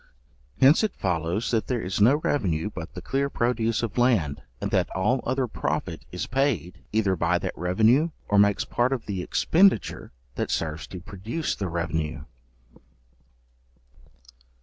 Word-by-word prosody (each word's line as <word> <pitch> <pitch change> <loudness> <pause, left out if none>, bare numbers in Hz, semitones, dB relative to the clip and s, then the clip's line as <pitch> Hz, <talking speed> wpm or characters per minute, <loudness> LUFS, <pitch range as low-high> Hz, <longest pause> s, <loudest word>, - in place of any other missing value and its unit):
Hence 140 +9 +6
it 215 - -1
follows, 90 +4 -1
that 115 -2 0
there 125 -3 -1
is 90 +2 -2
no 120 +7 +6
revenue 105 - -1
but 80 -1 -8
the 90 - -7
clear 140 +1 0
produce 120 -3 0
of 115 +1 -2
land, 105 - +2 0.2
and - - -3
that - - +2
all 105 +8 +1
other 130 0 +1
profit 115 - -3
is - - -3
paid, 130 -9 -1
either 105 -3 +2
by - - +1
that - - -4
revenue, 110 - +3 0.2
or 105 - +3
makes 100 0 +3
part 125 +2 +1
of 125 - -4
the 95 -3 -3
expenditure 190 - +2 0.2
that - - -3
serves 80 0 -2
to 90 - -8
produce 105 - -4
the 95 - -3
revenue. 80 -2 -2
105 Hz, 150 wpm, -25 LUFS, 90-130 Hz, 0.2 s, Hence